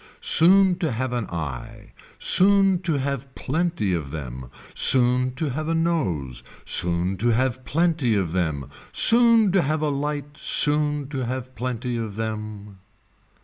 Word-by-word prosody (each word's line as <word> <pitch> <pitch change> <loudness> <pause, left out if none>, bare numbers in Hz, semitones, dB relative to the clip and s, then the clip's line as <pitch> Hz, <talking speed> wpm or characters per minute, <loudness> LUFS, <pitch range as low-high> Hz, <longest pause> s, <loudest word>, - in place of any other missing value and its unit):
Soon 185 +2 +4
to 160 -5 -2
have 125 +2 -3
an 120 -3 -3
eye, 70 -7 -7 0.3
soon 195 -1 +3
to 170 -2 -2
have 140 -1 -4
plenty 160 - -2
of 80 -5 -4
them, 65 -4 -8 0.2
soon 125 0 +4
to 155 -1 -3
have 155 +4 -5
a 165 - -1
nose, 125 - -2 0.2
soon 90 +2 0
to 115 +6 -2
have 130 +2 0
plenty 160 -7 0
of 95 -5 -2
them, 80 -7 -3 0.2
soon 230 -3 +4
to 190 0 +2
have 155 +1 -2
a 150 - 0
light 145 0 -4
soon 150 -1 +2
to 130 -4 -4
have 130 0 -6
plenty 125 0 -4
of 110 -3 -6
them. 105 -2 -7
130 Hz, 145 wpm, -22 LUFS, 105-155 Hz, 0.3 s, Soon